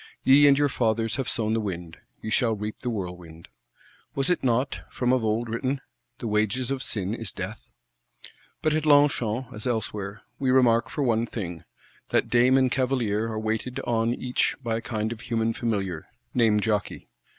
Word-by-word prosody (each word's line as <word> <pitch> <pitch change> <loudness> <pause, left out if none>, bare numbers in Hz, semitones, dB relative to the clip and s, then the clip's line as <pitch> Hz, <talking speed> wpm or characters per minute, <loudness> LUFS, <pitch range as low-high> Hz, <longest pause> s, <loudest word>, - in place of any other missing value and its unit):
Ye 145 +2 +7
and 140 -1 +6
your 145 0 +3
fathers 115 -3 0
have 135 -3 -1
sown 110 -1 0
the 115 - +1
wind, 90 -5 -5 0.3
ye 110 - -4
shall 115 0 +2
reap 105 +1 -5
the 125 - -3
whirlwind. 90 -6 -6 0.7
Was 135 +5 +1
it 180 - 0
not, 130 +2 +1
from 125 0 0
of 130 -3 +1
old, 110 +2 0
written: 130 +4 -1 0.4
The - - -7
wages 110 +4 +1
of 135 -1 -2
sin 100 -5 -1
is - - -4
death? - - -7 0.9
But 155 - +2
at 155 0 0
Longchamp, 130 -4 +3
as 105 +2 -6
elsewhere, 105 -4 -3 0.2
we 135 - 0
remark 125 -2 +4
for 145 - -2
one 115 -2 +1
thing, 90 -8 -6 0.4
that - - +1
dame 125 +2 +5
and 130 -2 +3
cavalier 120 -5 0
are 110 -1 -3
waited 110 +3 -2
on 115 -1 +1
each 125 0 0
by 115 -1 0
a - - -4
kind 110 -3 -2
of 115 -1 -6
human 115 0 0
familiar, 100 -8 -2 0.3
named 110 -4 +3
_jokei. 105 -2 -1
115 Hz, 180 wpm, -26 LUFS, 105-130 Hz, 0.9 s, Ye